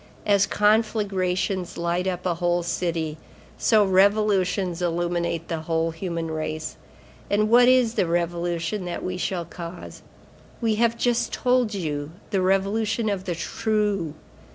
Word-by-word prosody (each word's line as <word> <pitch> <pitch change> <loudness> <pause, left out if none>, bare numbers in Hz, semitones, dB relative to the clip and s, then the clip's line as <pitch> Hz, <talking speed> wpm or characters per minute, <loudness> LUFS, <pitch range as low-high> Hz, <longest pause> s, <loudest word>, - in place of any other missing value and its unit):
As 200 -1 +4
conflagrations 200 -4 +1
light 170 +2 -1
up 180 -1 -3
a 180 - +2
whole 175 0 0
city, 165 -3 -2 0.4
so 215 -3 +4
revolutions 190 -2 +2
illuminate 170 -1 -1
the 165 - -2
whole 165 +1 -1
human 165 -1 -4
race. 155 0 -4 0.5
And 215 +1 +2
what 245 +1 +7
is 250 -3 +4
the 185 - +1
revolution 170 +2 -1
that 175 - -4
we 185 0 -3
shall 180 -1 -2
cause? 170 +1 -9 0.6
I 225 - +3
have 230 +2 +2
just 240 0 +1
told 250 -4 +1
you, 150 -4 -3 0.2
the 195 - +1
Revolution 210 +4 +1
of 195 -2 -3
the 175 -3 -2
True. 205 -4 -1
185 Hz, 135 wpm, -24 LUFS, 170-210 Hz, 0.6 s, what